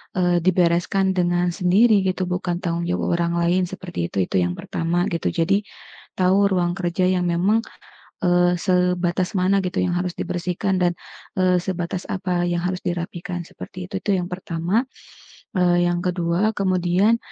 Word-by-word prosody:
eee, 180 -1 +2
dibereskan 180 +2 +2
dengan 175 -1 +1
sendiri 200 +5 +4
gitu, 190 -1 -1
bukan 180 0 -2
tanggung 170 0 -1
jawab 175 -1 0
orang 170 0 0
lain 175 +2 +2
seperti 175 - -5
itu, 95 +2 0
itu 90 - 0
yang 90 0 0
pertama, 170 +1 -1
gitu. 170 - -1
Jadi, 195 +5 +1 0.5
tahu 190 +2 +3
ruang 175 -2 +1
kerja 175 0 -1
yang 180 -1 +1
memang, 180 +6 +2 0.7
eee, 175 0 +3
sebatas 180 0 +1
mana 190 +2 +3
gitu, 180 -2 -4
yang 180 - -1
harus 180 0 -2
dibersihkan, 180 +2 -2
dan 175 -1 +3 0.4
eee, 185 -1 +3
sebatas, 175 0 -4
apa 185 -2 -1
yang 175 0 -1
harus 185 0 -2
dirapikan, 175 0 -4
seperti 180 +2 -9
itu, 195 0 -4
itu 205 - -1
yang 180 - -2
pertama. 180 +5 -1 0.7
Eee, 175 -1 +3
yang 175 0 +1
kedua, 180 +4 +1
kemudian, 185 +3 +2
180 Hz, 155 wpm, -22 LUFS, 175-185 Hz, 0.7 s, sendiri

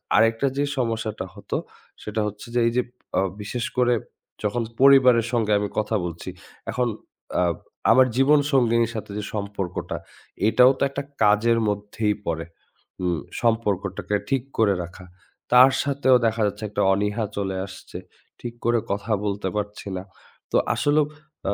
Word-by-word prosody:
আরেকটা 115 +4 +3
যে 140 - +2
সমস্যাটা 115 -5 -2
হতো, - - -4 0.5
সেটা 105 +1 -2
হচ্ছে 105 +2 -8
যে - - +4
এই - - +2
যে 125 - +5 0.4
আ - - +3 0.2
বিশেষ 115 +3 -3
করে 125 -1 +4 0.5
যখন 110 +3 0 0.2
পরিবারের 130 -4 +7
সঙ্গে 110 -3 +1
আমি 105 - -2
কথা 110 +1 -1
বলছি। 85 -1 -6 0.4
এখন 125 -1 0 0.5
আ - - +4 0.5
আমার 130 0 +6
জীবন 145 +3 +5
সঙ্গিনীর 115 -3 +3
সাথে 105 -2 -5
যে 105 - -3
সম্পর্কটা 100 -4 -4 0.5
এটাও 125 +3 +6
তো - - +2
একটা 140 +1 -4 0.2
কাজের 110 +3 +4
মধ্যেই 105 +1 -1
পড়ে। 80 0 -2 0.6
উ - - 0 0.4
সম্পর্কটাকে 105 -4 0
ঠিক 135 -3 +1 0.2
করে 105 -3 +4
রাখা। 85 +2 -11 0.5
তার 125 +2 +8
সাথেও 140 -2 +3
দেখা 110 0 -1
যাচ্ছে, 105 +2 -5
একটা 105 - -1
অনীহা 105 +3 0
চলে 95 -1 -2
আসছে। 90 -2 -10 0.4
ঠিক 120 -1 -6
করে 120 0 +3
কথা 105 +3 -3
বলতে 100 -1 -2
পারছি 105 -1 -4
না। 90 - -5 0.5
তো - - +3 0.2
আসলেও 145 0 +3 0.5
আ - - +1
110 Hz, 150 wpm, -24 LUFS, 105-125 Hz, 0.6 s, তার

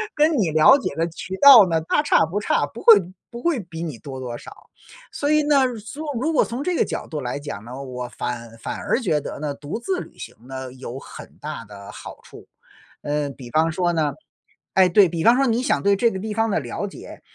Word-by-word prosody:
跟 305 +2 +4
你 170 -6 +1
了 155 - +6
解 205 - -4
的 165 +1 0
渠 185 +3 -7
道 255 -9 +10
呢， 165 -1 0
大 165 - +1
差 295 - +3
不 180 +6 -3
差， 145 - +1
不 225 +11 -11
会 230 - +9 0.3
不 235 0 -9
会 335 -7 +1
比 170 -3 -7
你 150 -8 -5
多 130 -1 -8
多 120 -2 -5
少。 - - -14 0.4
所 290 - -2
以 305 0 +4
呢， 270 -5 +2
缩 250 +9 -8 0.2
如 320 - 0
果 310 - +3
从 250 +4 -5
这 360 +1 -1
个 - - +2
角 - - -5
度 155 -3 -5
来 125 +1 -4
讲 145 -8 -7
呢， 130 +3 -8
我 125 -1 -6
反 115 -2 -6
反 - - -5
而 - - 0
觉 160 -9 +1
得 - - -7
呢， 145 -1 -3
独 145 +10 -6
自 365 +9 -2
旅 - - -11
行 - - -9
呢， 130 -1 -7
有 130 -1 -8
很 - - -12
大 150 -6 -6
的 100 -1 -11
好 - - -10
处。 - - -14 0.5
呃， 145 -1 -2
比 125 -3 -11
方 160 +1 +2
说 175 +1 0
呢 150 -4 0 0.6
诶， 185 -1 +5
对， 190 +1 +6
比 165 -1 -3
方 235 +2 +6
说 275 - +3
你 235 0 +1
想 140 - 0
对 200 0 +4
这 235 +3 +3
个 190 - -5
地 215 +1 -4
方 225 +1 0
的 195 - +1
了 140 +10 -5
解 - - -11
165 Hz, 250 characters per minute, -22 LUFS, 140-230 Hz, 0.6 s, 道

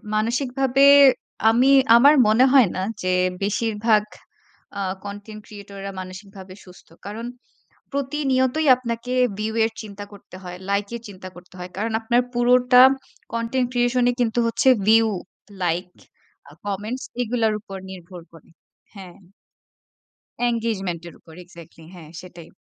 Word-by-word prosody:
মানসিকভাবে 255 +4 +1 0.7
আমি 250 +4 +3 0.3
আমার 285 +5 +6
মনে 220 +4 +4
হয় 255 -8 +6
না - - -2 0.2
যে 185 0 0 0.3
বেশিরভাগ 215 +1 +1 0.8
আ - - -1 0.2
কনটেন্ট 205 +1 -9
ক্রিয়েটররা 200 -1 -9
মানসিকভাবে 190 0 -11
সুস্থ। 180 -1 -17 0.2
কারণ 220 +3 -6 0.7
প্রতিনিয়তই 275 +1 -1
আপনাকে 235 0 -5 0.3
ভিউ 215 +1 -3
এর 225 - -1
চিন্তা 205 -1 -9
করতে 200 -2 -14
হয়, 180 -1 -8
লাইকের 205 +4 -2
চিন্তা 185 -2 -10
করতে 180 +1 -16
হয়। 180 0 -8
কারণ 220 +3 -3
আপনার 235 +2 +1
পুরোটা 250 +1 +5 0.5
content 230 +2 -1
creation 245 0 +1
ই - - -2
কিন্তু 235 -1 0
হচ্ছে 230 +3 +1 0.2
ভিউ, 225 0 +5 0.5
লাইক, 175 +1 -1 0.6
আ - - -16
কমেন্টস 210 +6 -4 0.2
এগুলার 230 -2 0
উপর 195 -2 -10
নির্ভর 180 -1 -11
করে। 165 -2 -18 0.5
হ্যাঁ। 185 -3 -11 1.3
engagement 210 -7 -3
এর 170 - -11
উপর 160 - -17
এক্সাক্টলি 170 -2 -16
হ্যাঁ 160 -4 -13
সেটাই। 175 -2 -13
215 Hz, 125 wpm, -22 LUFS, 190-245 Hz, 1.3 s, আমার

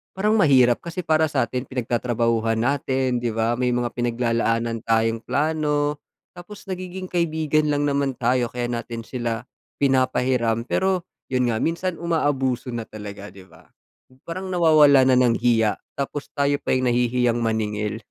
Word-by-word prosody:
parang 210 +3 +1
mahirap, 130 - +4
kasi 170 +1 -6
para 155 0 +2
sa'tin 130 -3 -2
pinagtatrabahuhan 115 -2 0
natin, 130 0 0
'di 120 -1 -2
ba? 115 +1 +1
May 125 -1 +1
mga 120 -1 -1
pinaglalaanan 115 -1 0
tayong 115 0 +1
plano, 150 -1 0 0.4
tapos 190 +4 -11
nagiging 185 0 -6
kaibigan 155 -3 +1
lang 145 0 0
naman 140 -2 0
tayo 125 0 +1
kaya 120 -1 -3
natin 115 -1 -5
sila 115 -1 -4 0.4
pinapahiram. 130 -4 +1
Pero 190 -2 0 0.3
yun 125 -1 +1
nga 110 - -1
minsan, 170 +2 -2
umaabuso 145 -7 -1
na 115 -1 -3
talaga, 105 -1 -9
'di 95 - -14
ba? - - -20 0.6
Parang 185 +3 -5
nawawala 155 -6 +5
na 130 -1 +4
ng 120 -2 +3
hiya, 115 -3 +2 0.2
tapos 140 +1 -4
tayo 145 0 +1
pa - - 0
yung 130 -1 +1
nahihiyang 120 0 +1
maningil. 105 -1 -2
125 Hz, 145 wpm, -23 LUFS, 115-150 Hz, 0.6 s, nawawala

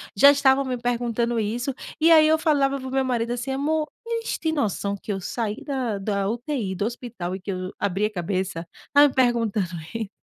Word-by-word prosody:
já 280 +8 +8
estavam 275 -1 +3
me 255 -1 -2
perguntando 240 -1 -1
isso, 240 +5 -2 0.3
e 330 - +6
aí 310 -1 +8
eu 315 +1 +4
falava 275 -4 +2
para 260 - -7
o - - -6
meu 265 0 +1
marido 240 -2 -1
assim: 245 +2 -3
"Amor, 305 +3 0 0.2
eles 460 0 -2
têm 320 -1 0
noção 205 - -1
que 205 - -6
eu 195 - -4
saí 215 +1 -3
da 255 -8 -2
da 200 -1 -1
UTI, 235 -2 -2
do 200 - -1
hospital, 230 -7 -5
e 190 - -8
que 195 +1 -4
eu 185 0 -4
abri 200 +1 0
a 210 - -1
cabeça? 175 -2 -3 0.2
Tá 290 0 +7
me 265 - -4
perguntando 230 -7 +1 0.2
i". 220 -3 -3
240 Hz, 210 wpm, -24 LUFS, 200-275 Hz, 0.3 s, já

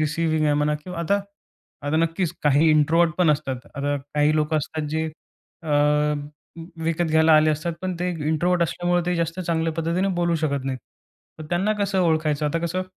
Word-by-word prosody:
Receiving 155 +1 0
आहे 150 -1 +3
म्हणा 150 +1 +1
किंवा 175 +3 -9
आता, 200 +4 +1 0.7
आता 150 +2 +1
नक्कीच 165 +1 0
काही 145 +2 +4
इंट्रोव्हर्ट 155 +2 +3
पण 175 -4 +4
असतात. 145 -3 -1 0.2
आता 145 0 -1 0.2
काही 150 +1 +3
लोकं 155 +1 +1
असतात 155 0 -3
जे 160 +1 -1 0.6
अ, 160 - -8 1.2
विकत 165 +1 0
घ्यायला 160 0 +4
आले 155 0 +4
असतात, 155 +3 -2
पण 185 -1 -2
ते 180 - 0 0.2
इंट्रोव्हर्ट 175 +3 +1
असल्यामुळे 175 +1 0
ते 180 - +1
जास्त 165 +2 -2
चांगल्या 165 -2 -1
पद्धतीने 170 +4 -1
बोलू 175 -1 +1
शकत 140 -4 -1
नाहीत. 130 -1 -3 0.6
तर 155 - -7
त्यांना 190 +5 +1
कसं 200 -1 0
ओळखायचं 155 -3 +1
आता 150 +3 0
कसं. 185 +3 -2
160 Hz, 175 wpm, -23 LUFS, 150-175 Hz, 1.2 s, काही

